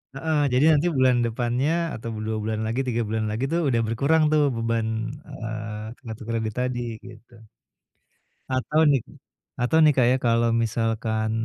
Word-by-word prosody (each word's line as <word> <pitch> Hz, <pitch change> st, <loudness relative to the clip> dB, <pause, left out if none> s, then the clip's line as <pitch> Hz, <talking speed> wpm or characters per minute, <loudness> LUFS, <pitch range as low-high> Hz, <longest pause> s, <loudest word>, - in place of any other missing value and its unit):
Heeh, 155 Hz, +2 st, 0 dB
jadi 130 Hz, +4 st, +4 dB
nanti 150 Hz, +4 st, +1 dB
bulan 130 Hz, -1 st, +4 dB
depannya 120 Hz, +5 st, 0 dB, 0.2 s
atau 115 Hz, +1 st, -6 dB, 0.2 s
2 110 Hz, 0 st, -2 dB
bulan 110 Hz, 0 st, -2 dB
lagi 115 Hz, +4 st, -2 dB
3 120 Hz, -1 st, 0 dB
bulan 110 Hz, 0 st, -1 dB
lagi 110 Hz, +4 st, -3 dB
tuh 170 Hz, -, +1 dB
udah 120 Hz, -3 st, +2 dB
berkurang 140 Hz, +8 st, +2 dB
tuh 155 Hz, -1 st, +4 dB
beban, 115 Hz, -1 st, -1 dB, 0.4 s
eee, 110 Hz, 0 st, -6 dB
kartu 110 Hz, -2 st, -8 dB
kredit 110 Hz, -2 st, -2 dB
tadi 125 Hz, -1 st, -1 dB, 0.3 s
gitu. 120 Hz, +1 st, -15 dB, 1.2 s
Atau 130 Hz, +4 st, +1 dB
nih 135 Hz, -3 st, +3 dB, 0.6 s
atau 125 Hz, +6 st, +2 dB
nih, 150 Hz, -1 st, +6 dB
Kak, 125 Hz, -3 st, +3 dB
ya 130 Hz, -, +3 dB
kalau 115 Hz, -2 st, +2 dB
misalkan, 110 Hz, -1 st, -1 dB
115 Hz, 155 wpm, -24 LUFS, 110-130 Hz, 1.2 s, nih